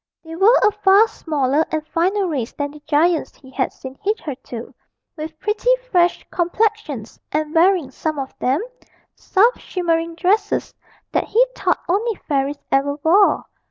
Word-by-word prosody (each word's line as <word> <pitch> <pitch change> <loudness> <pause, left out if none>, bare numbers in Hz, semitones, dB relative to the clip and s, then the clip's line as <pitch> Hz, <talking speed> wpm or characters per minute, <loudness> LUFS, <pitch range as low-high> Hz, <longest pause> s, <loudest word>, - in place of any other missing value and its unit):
They 325 0 -9
were 405 +8 +5
a 420 - +5
far 415 +1 +5
smaller 295 -5 0
and 310 -1 -2
finer 375 +6 0
race 265 -8 -3
than 285 -1 -3
the 300 - -13
giants 320 +2 +2
he 265 -2 -17
had 260 -1 -1
seen 260 0 -10
hitherto, 275 - -4 0.4
with 310 0 -7
pretty 425 +4 -1 0.2
fresh 350 -1 +2
complexions, 350 - -1
and 305 0 -1
wearing, 335 -4 +3
some 310 +2 -3
of 270 -1 -5
them, 270 +10 +1 0.5
soft 450 +6 +2
shimmering 335 -2 -1
dresses 400 +4 0 0.4
that - - 0
he 480 +3 +3
thought - - 0
only 425 +5 0
fairies 280 0 0
ever 280 +1 +2
wore. 385 +5 +4
330 Hz, 150 wpm, -20 LUFS, 285-395 Hz, 0.5 s, were